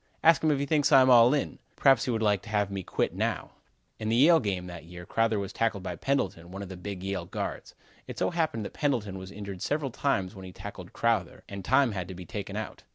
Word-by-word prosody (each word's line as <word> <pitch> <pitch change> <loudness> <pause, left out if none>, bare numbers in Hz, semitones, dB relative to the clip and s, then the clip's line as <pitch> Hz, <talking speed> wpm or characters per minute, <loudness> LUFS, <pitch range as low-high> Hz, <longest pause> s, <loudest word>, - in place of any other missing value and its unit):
Ask 165 -2 +6
him 155 - +4
if 145 - +3
he 140 - -1
thinks 145 -1 +2
I'm 130 -1 +7
all 120 0 +8
in? 145 -2 -1 0.2
Perhaps 135 -4 +4
he - - -3
would 110 -2 0
like 105 -3 +2
to 110 - -12
have 105 -2 0
me 100 -1 -3
quit - - -1
now." - - -2 0.5
In 110 - -2
the 115 - +2
Yale 160 +7 +6
game 95 -7 -2
that 85 -2 -9
year 90 +1 -10
Crowther 115 +1 +1
was 100 -1 -4
tackled 110 -4 0
by - - -4
Pendleton, 95 -11 -1
one 95 +2 -6
of 95 - -8
the 95 - -7
big 95 +1 -6
Yale 95 -3 -3
guards. - - -5 0.3
It - - -7
so - - 0
happened 160 -11 -1
that - - -7
Pendleton 110 -10 -1
was 95 +1 -9
injured 100 -3 -7
several 145 -2 -1
times 100 -8 0
when 95 -3 -10
he 95 - -8
tackled - - -9
Crowther 110 -7 0
and 100 -1 -7
time 130 +3 +3
had 95 -4 -4
to 95 - -7
be 90 0 -9
taken 100 -2 -6
out. 110 -1 -5
105 Hz, 250 wpm, -28 LUFS, 95-130 Hz, 0.5 s, all